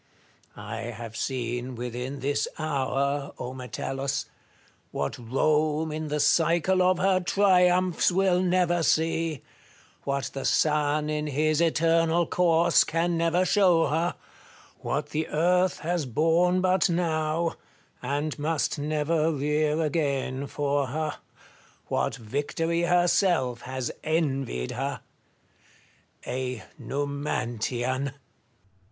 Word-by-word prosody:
I - - -7 0.2
have 115 -1 -8
seen 125 0 -3
within 125 +3 -5
this 145 +2 0
hour, 140 -2 -1 0.2
Metellus, 135 +1 -3 0.6
what 70 - -3
Rome 155 +6 +1
in 155 0 -4
the 150 0 -2
cycle 170 +5 +3
of 180 0 +3
her 190 0 +3
triumphs 180 -2 +3
will 185 0 +2
never 180 -1 +2
see, 160 -2 0 0.6
what 140 -1 -2
the 135 - -4
Sun 150 0 +1
in 150 0 -2
his 155 +2 +1
eternal 165 +1 +3
course 170 0 +3
can 170 +1 0
never 170 +2 +2
show 180 -6 +4
her, 165 +4 0 0.6
what - - -2
the 155 +1 -2
Earth 180 +3 +1
has 170 -3 -1
borne 165 +8 +2
but 185 0 +3
now, 165 -1 0 0.5
and 145 +4 -2
must 155 0 -1
never 155 +2 0
rear 150 +1 0
again 140 -3 -1
for 145 -1 -1
her, 155 +3 -3 0.7
what - - 0
Victory 145 +8 -2
herself 175 -7 +2
has 130 -1 -4
envied 135 - -1
her, - - -3 0.7
— - - -28
a 125 -2 -4 0.2
Numantian. 130 -2 -2
155 Hz, 110 wpm, -26 LUFS, 140-170 Hz, 0.7 s, show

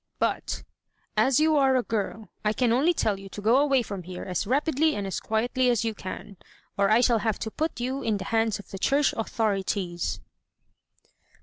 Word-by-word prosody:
But, - - -1 0.5
as 265 0 +4
you 310 0 +4
are 270 -2 +4
a 255 - +2
girl, 220 -1 -3
I 210 0 +2
can 245 0 +1
only 275 +9 +4
tell 215 - 0
you 195 0 -10
to 205 - -8
go 225 +5 +4
away 275 -3 +3
from 200 -3 -6
here 180 +1 -7
as 185 +2 -2
rapidly 300 +4 +2
and 205 - -3
as 195 - -3
quietly 245 +3 +1
as 235 -2 +2
you 225 - 0
can, 200 0 -8 0.4
or 200 0 +2
I 220 +3 +5
shall 235 -2 +3
have 220 -1 0
to 220 - -5
put 310 0 -2
you 260 +3 -2
in 215 -2 0
the 190 - -6
hands 225 -1 +1
of 205 - -13
the 195 - -6
church 280 +6 +2
authorities!" 195 -5 -1
225 Hz, 200 wpm, -26 LUFS, 200-260 Hz, 0.5 s, I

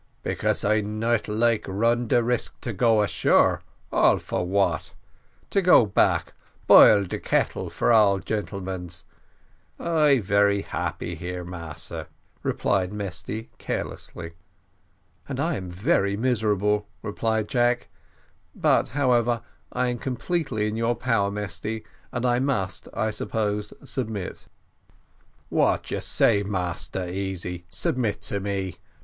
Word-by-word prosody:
"Because - - 0
I 110 +1 +3
not 110 +2 -1
like 110 +1 +2
run 115 +5 +1
de 120 +1 +3
risk 120 +1 -1
to 120 - -4
go 110 +1 +3
ashore 105 - +3 0.3
all - - +4
for - - -3
what? 100 +1 0 0.6
to 195 - +3
go 180 -10 +6
back, 100 - +1 0.3
boil 100 -1 +8
de - - -4
kettle - - 0
for - - +1
all 105 -3 +5
gentlemans 95 -4 -4 0.7
I 155 -4 +3
very 100 0 +2
happy - - -4
here, 90 0 -5
Massa," 85 -4 -4 0.3
replied 95 -2 0
Mesty 105 +2 -5
carelessly. 85 -1 -5 1.0
"And 135 -2 -3
I 165 +4 +1
am 95 -6 -5
very 100 - +1
miserable," 105 -3 +1 0.2
replied 110 +1 -1
Jack; 120 0 +1 0.7
"but, - - +2
however, 120 -4 +2 0.3
I 125 0 0
am 120 -1 -3
completely 130 -4 -1
in 105 - -3
your 115 +1 +1
power, 115 -4 +1
Mesty, 105 +2 -4 0.3
and 120 +1 -2
I 120 0 +3
must, 115 -9 -1
I 110 - 0
suppose, 105 -1 -2
submit." 110 -7 -4 1.0
"What - - +1
you - - -1
say, 105 -3 +2
Massa 90 -2 -3
Easy 90 -2 -4
submit 125 - -1
to 100 - -2
me? 95 -2 -3
105 Hz, 125 wpm, -25 LUFS, 100-120 Hz, 1.0 s, boil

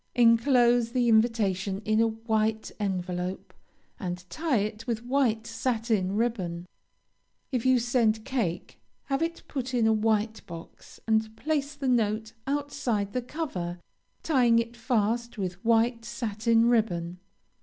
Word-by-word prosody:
Enclose 240 0 +4
the 250 -2 +2
invitation 210 -4 +2
in 215 +1 +3
a 230 - +4
white 220 -1 -1
envelope, 185 -2 -3 0.5
and 180 -3 -5
tie 315 -5 0
it 215 +3 -3
with 230 -1 -2
white 245 -4 +1
satin 225 -4 -1
ribbon. 185 -7 -1 0.9
If 250 -1 0
you 260 -1 +5
send 230 -2 +1
cake, 215 -11 -3 0.2
have 275 +1 -1
it 335 +1 -2
put 260 -2 -3
in 235 -2 +3
a 220 - +4
white 220 0 +1
box, 170 -1 -11
and 220 0 +1
place 290 -1 -1
the 280 -2 -3
note 220 -2 +1
outside 275 -8 -1
the 250 - 0
cover, 235 - -4 0.5
tying 250 -7 +4
it 230 +1 -1
fast 235 0 -1
with 185 -2 -4
white 230 +1 +2
satin 230 -1 +1
ribbon. 180 -7 +1
225 Hz, 135 wpm, -27 LUFS, 210-245 Hz, 0.9 s, you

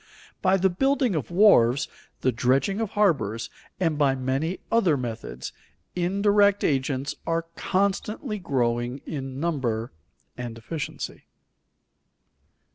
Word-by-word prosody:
By 190 -1 +4
the 190 0 +2
building 270 +3 +2
of 155 -5 -2
wharves, 160 - +5 0.3
the 130 - +3
dredging 135 - +1
of 220 - -1
harbors, 140 - +1 0.3
and 165 -5 +1
by 140 -2 +3
many 135 +7 -1
other 190 -10 +3
methods, 115 -3 -5 0.4
indirect 200 +3 +3
agents 135 0 0
are 165 0 0
constantly 205 +4 -1
growing 120 -4 -1
in 135 -3 -5
number 130 -8 -1 0.4
and 120 -2 -6
efficiency. 145 +6 -6
155 Hz, 110 wpm, -25 LUFS, 130-195 Hz, 0.4 s, wharves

